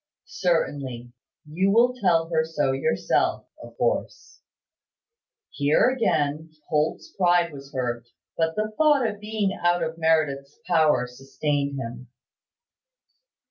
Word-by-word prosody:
"Certainly. 140 -8 -2 0.3
You 175 +6 0
will 235 +4 +4
tell 175 -9 +2
her 160 -2 +2
so 155 -4 -1
yourself, 135 - 0 0.2
of - - -13
course." - - -2 1.1
Here 150 - +3
again 160 - 0 0.2
Holt's 155 - -1
pride 175 -3 +2
was 140 0 -11
hurt; 120 -2 -3 0.3
but 165 0 0
the 215 0 -2
thought 295 -4 +4
of 210 -2 -5
being 210 -2 -1
out 175 0 +1
of 160 +1 -4
Meredith's 150 -4 0
power 155 -7 +3
sustained 140 +3 -3
him. 120 +1 -7
160 Hz, 115 wpm, -24 LUFS, 140-190 Hz, 1.1 s, will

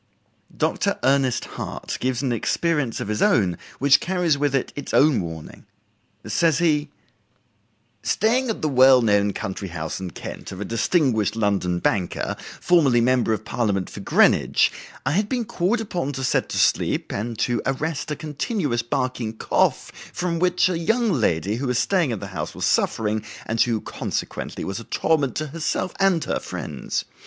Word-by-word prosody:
Dr. - - 0
Ernest 135 -2 +2
Hart - - -6
gives 130 +1 -1
an 130 - 0
experience 140 +2 0
of - - -4
his 105 0 -2
own 95 -6 +3 0.2
which 135 0 +5
carries 180 -4 +1
with 140 -1 0
it 135 - -1
its 145 - -4
own 145 -6 +5
warning. 80 -2 -8 0.6
Says 165 -4 +2
he: 150 -3 +1 1.1
"Staying 245 +3 +1
at 220 - -3
the - - +2
well 130 -2 +6
known 105 -2 +3
country 95 +1 -5
house 80 -2 -5
in 95 -1 -5
Kent - - -8
of 95 - -8
a 105 - -3
distinguished 115 - +1
London 100 -5 0
banker, 90 0 -1 0.2
formerly 150 -9 +4
member 125 -1 +2
of 110 0 -2
Parliament 100 -6 -1
for - - -8
Greenwich, - - +3 0.3
I 135 - +1
had 205 +6 +1
been 245 -3 -1
called 200 +5 0
upon 175 -9 -3
to 135 0 -4
set - - +1
to - - -3
sleep, - - +1
and 115 +2 -3
to 120 +1 0
arrest 150 +4 -2
a 150 - -2
continuous 150 - -2
barking 125 -3 -2
cough - - +1 0.2
from 175 -2 -2
which 180 +1 +3
a 180 -3 -1
young 225 +6 +1
lady 105 - +1
who 135 +2 -2
was 125 -1 0
staying 180 -3 +2
in 115 - -2
the - - -7
house - - -4
was - - -2
suffering, 110 -1 +1 0.2
and 115 0 0
who, 115 -2 +2
consequently, - - -4
was 95 +3 -4
a - - -8
torment 140 0 0
to 155 - -1
herself 165 +4 -2
and 195 -4 +3
her - - -1
friends. - - -4
130 Hz, 170 wpm, -23 LUFS, 110-165 Hz, 1.1 s, well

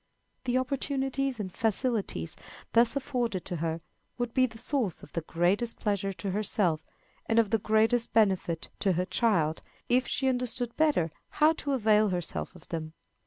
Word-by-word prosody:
The 250 0 +2
opportunities 270 -1 -1
and 190 -3 -4
facilities 220 - -1 0.4
thus 235 +3 +4
afforded 245 -8 -1
to 180 - -3
her 165 +1 -2 0.4
would 240 -1 -2
be 255 0 +4
the 225 -1 -12
source 235 - -1
of - - -13
the 165 - -1
greatest 180 +9 0
pleasure 200 -2 0
to 195 +1 -4
herself, 190 -5 +1 0.5
and 225 - +1
of 225 -3 +4
the 225 - +3
greatest 220 +3 +2
benefit 190 -6 +2
to 195 -3 +2
her 180 +2 0
child, 175 -8 +1 0.3
if 250 +1 +3
she 265 +1 0
understood 245 -2 -1
better 290 - +2 0.3
how 310 +1 +6
to 285 -3 -3
avail 215 -4 +4
herself 170 - -3
of - - -15
them. 160 -2 -4
220 Hz, 165 wpm, -29 LUFS, 180-250 Hz, 0.5 s, how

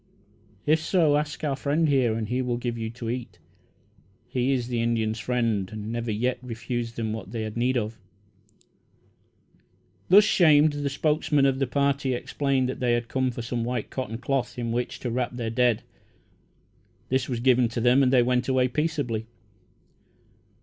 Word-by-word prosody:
If 155 +1 +3
so, 160 -3 +3
ask 150 +1 -2
our 145 -3 0
friend 150 +4 +1
here 130 -6 +2
and 110 -1 -3
he 125 +4 -1
will 125 -1 -1
give 120 -1 -3
you 115 -1 -4
to 115 0 -7
eat. 115 -6 -4 0.9
He 125 +1 0
is 125 -3 0
the 120 -2 -1
Indians' 115 -1 0
friend, 115 -6 0
and 110 0 -6
never 120 0 -3
yet 125 +4 -1
refused 120 -1 -4
them 110 -2 -2
what 110 -4 -7
they 115 -2 -3
had 110 -1 -5
need 125 +2 +1
of." 110 -1 -3 2.1
Thus 200 +4 +8
shamed, 155 -6 +5
the 145 -1 -2
spokesman 150 0 +1
of 135 -1 +2
the 135 - +1
party 140 0 0
explained 135 +1 0
that 130 - -4
they 125 -2 +2
had 120 0 -1
come 130 -1 0
for 120 -1 -5
some 120 0 -2
white 125 +1 -3
cotton 115 -4 -4
cloth 130 0 -2
in 120 -1 -2
which 120 +1 -2
to 120 - -3
wrap 125 0 -2
their 115 -2 -3
dead. 120 -1 +2 1.3
This 130 0 0
was 120 -2 -2
given 125 0 +4
them 120 +3 +3
and 130 -2 +3
they 125 -2 +5
went 125 0 +1
away 130 -1 +2
peaceably. 125 -6 -2
125 Hz, 175 wpm, -26 LUFS, 115-135 Hz, 2.1 s, Thus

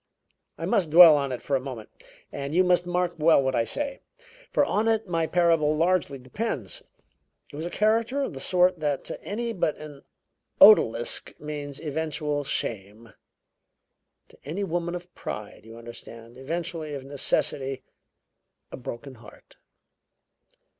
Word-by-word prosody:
I - - -4
must 180 -6 +1
dwell 165 0 +9
on 140 -2 -1
it 125 - -5
for 140 - 0
a - - +2
moment, 130 -5 -8 0.4
and 140 +3 -5
you 185 - +5
must 180 -1 +2
mark 175 0 0
well 160 0 +5
what 130 0 0
I 115 - +1
say, 280 - -3 0.5
for - - +3
on 215 +2 0
it 225 -2 +1
my 165 -2 0
parable 165 -4 +2
largely 165 -4 +1
depends. 130 - -4 0.7
It - - -8
was 160 +3 -4
a - - -5
character 225 +8 +1
of - - -4
the 135 - -7
sort 180 +2 +2
that 145 -3 -1
to - - -8
any 230 +3 -3
but 170 -6 -1
an 150 -2 -11 0.6
odalisk 120 - +5
means 145 -2 -6
eventual 150 -1 -3
shame; 110 -3 -5 1.2
to - - -21
any 170 +8 -4
woman 175 -1 -2
of 180 0 -9
pride, 105 0 -7
you 115 +1 -12
understand, 115 0 -11
eventually 160 +2 -5
of 135 - -7
necessity 135 -1 -1 0.9
a - - -7
broken 130 +2 -8
heart. 115 -2 -17
150 Hz, 150 wpm, -26 LUFS, 135-180 Hz, 1.2 s, dwell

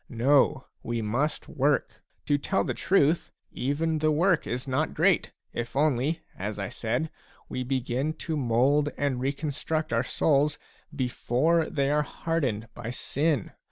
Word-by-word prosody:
No, 135 +3 +3 0.2
we 115 -1 -2
must 130 +9 -1
work. 140 +2 0 0.2
To 145 -1 +2
tell 190 +7 +1
the - - -2
truth, 170 -3 +2 0.2
even 155 +4 -1
the 155 0 +2
work 165 +3 +2
is 125 +4 -3
not 135 +4 0
great, - - +3 0.2
if 120 +1 -4
only, 150 +2 +1 0.2
as 105 +3 -3
I 100 -2 -3
said, 120 +8 -2 0.4
we 130 - -3
begin 130 +3 -1
to 160 0 -4
mould 140 +3 +3
and 140 -3 0
reconstruct 145 +2 -2
our 115 - +3
souls 145 +2 +2 0.4
before 145 +5 +1
they 140 -1 +1
are 150 0 +3
hardened 140 -8 -2
by 120 -1 -6
sin. 140 +1 0
140 Hz, 145 wpm, -27 LUFS, 125-155 Hz, 0.4 s, No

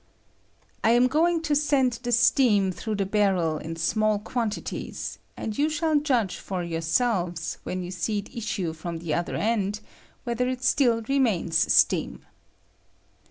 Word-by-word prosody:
I 225 - +5
am 245 +1 +5
going 325 +5 +2
to 300 -2 +1
send 275 -5 +2
the 245 - -3
steam 235 -5 +4
through 215 +4 -4
the 200 -1 -1
bar 200 0 +2
rel 165 -3 0
in 165 +1 -6
small 215 +6 +1
quantities, 220 +1 -4 0.2
and 215 - -4
you 295 +5 +1
shall 315 -1 +1
judge 240 -11 0
for 185 -2 -4
yourselves, 170 0 -1
when 185 0 -4
you 175 - -6
see 200 +4 -2
it 205 +5 -7
issue 205 -7 -3
from 165 +1 -6
the 165 -2 -3
oth 175 - -1
er - - -4
end, 210 -2 0 0.4
whether 250 0 -1
it 255 0 -4
stil! 240 -5 +3
remains 220 -12 +2
steam. - - +2
215 Hz, 160 wpm, -26 LUFS, 180-250 Hz, 0.4 s, I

